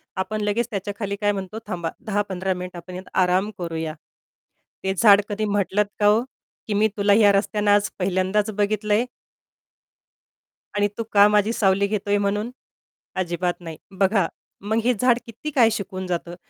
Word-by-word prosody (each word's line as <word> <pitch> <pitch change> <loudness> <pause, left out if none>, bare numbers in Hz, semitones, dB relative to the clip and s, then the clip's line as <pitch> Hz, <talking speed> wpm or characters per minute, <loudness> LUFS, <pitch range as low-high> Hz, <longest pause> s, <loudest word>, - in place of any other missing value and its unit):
आपण 210 +3 -2
लगेच 210 +3 0
त्याच्याखाली 200 0 -3
काय 205 - +3
म्हणतो 195 +2 -5
थांबा. 170 -2 -3 0.2
10-15 195 -3 -1
मिनिटं 180 -1 -7
आपण 180 +1 -9
यात 185 +1 -9
आराम 185 +3 +1
करूया. 165 -3 -4 0.9
ते 190 - 0
झाड 205 0 +7
कधी 215 +1 -1
म्हटलंत 205 0 +1
का, 205 - +5
ओ, 215 +3 +4 0.5
की 215 - -1
"मी 210 +2 +3
तुला 200 0 +4
ह्या 205 -1 +6
रस्त्यानं 205 +1 +1
आज 205 0 +3
पहिल्यांदाच 190 +3 +1
बघितलंय" 210 +2 +1 1.7
"आणि 205 0 +2
तू 230 - -1
का 205 0 +7
माझी 210 +1 +2
सावली 200 -2 +2
घेतोय" 205 0 0
म्हणून? 205 +3 -1 0.7
अजिबात 175 -1 -1
नाही. 165 -3 -8 0.2
बघा. 195 -3 +3 0.3
मग 220 +3 -1
हे 250 - +3
झाड 245 +2 +3
किती 235 +7 -7
काय 240 -5 +5
शिकून 190 -3 -4
जातं. 175 -1 -3
205 Hz, 155 wpm, -23 LUFS, 185-210 Hz, 1.7 s, झाड